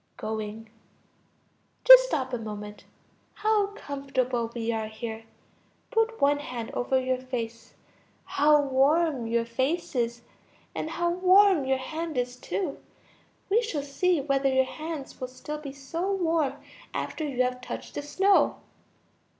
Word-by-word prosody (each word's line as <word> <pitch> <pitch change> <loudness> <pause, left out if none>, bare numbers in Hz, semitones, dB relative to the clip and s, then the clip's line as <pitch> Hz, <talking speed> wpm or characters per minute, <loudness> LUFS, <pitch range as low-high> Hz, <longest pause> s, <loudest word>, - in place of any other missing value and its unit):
(Going.) 220 0 -5 1.2
Just - - +10
stop 265 - -2
a 245 - -1
moment; 210 -1 -7 0.5
how 425 -1 +2
comfortable 265 - -2
we 230 -1 -1
are 220 -1 -2
here! 220 0 -7 0.7
Put 450 0 +1
one 285 +1 +3
hand 245 -5 -6
over 260 +2 +1
your 255 0 -1
face. 235 -3 -6 0.5
How 300 +1 +4
warm 275 -1 +2
your 230 0 +1
face 260 +9 -1
is, 235 -1 -1 0.5
and 315 - -3
how 345 +1 0
warm 370 -3 +5
your 265 0 +2
hand 315 +3 -5
is 245 0 -1
too! 305 +4 -4 0.7
We 425 +4 +3
shall 325 -12 -3
see 335 +5 +1
whether 275 -1 +1
your 265 0 +3
hands 310 -1 -7
will 255 - -2
still 295 +4 -7
be 290 -2 -7
so 325 +8 -4
warm 330 -6 +1 0.4
after 315 - -3
you 265 -4 0
have 250 0 -2
touched - - -7
the - - -3
snow. 385 +7 +3
275 Hz, 140 wpm, -27 LUFS, 245-330 Hz, 1.2 s, Just